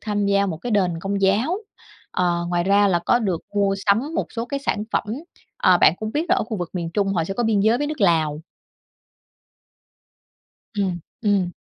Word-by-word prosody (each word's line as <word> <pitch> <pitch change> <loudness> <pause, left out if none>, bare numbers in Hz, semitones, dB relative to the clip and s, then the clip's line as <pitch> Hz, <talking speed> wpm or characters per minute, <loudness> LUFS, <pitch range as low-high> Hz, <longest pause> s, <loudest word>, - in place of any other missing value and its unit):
tham 205 -2 -1
gia 200 0 +2
một 165 -4 -3
cái 235 +9 -6
đền 180 -5 +1
Công 195 +2 -2
giáo. 220 - +2 0.5
Ờ, 175 -1 0
ngoài 175 -1 0
ra 200 +1 +4
là 175 -2 +2
có 205 +8 +2
được 190 -8 -1
mua 200 -1 +2
sắm 240 +11 +2
một - - -1
số 230 0 -3
cái 275 +2 -3
sản 210 -6 -1
phẩm, - - +1 0.5
ờ, 180 -1 +4
bạn - - +6
cũng 215 0 -5
biết 310 +3 0
là 365 - +5
ở - - 0
khu 220 -2 -4
vực 175 -2 -4
miền 170 -3 -3
Trung 200 -2 +1
họ 165 -3 +1
sẽ 195 - -4
có 240 - -1
biên 215 -3 +2
giới 220 +4 +3
với 290 - -1
nước 300 -3 -5
Lào. 160 -5 +2 2.3
Ừm, 190 -4 -1 0.2
ừm. 200 -4 +2
200 Hz, 205 wpm, -22 LUFS, 175-220 Hz, 2.3 s, bạn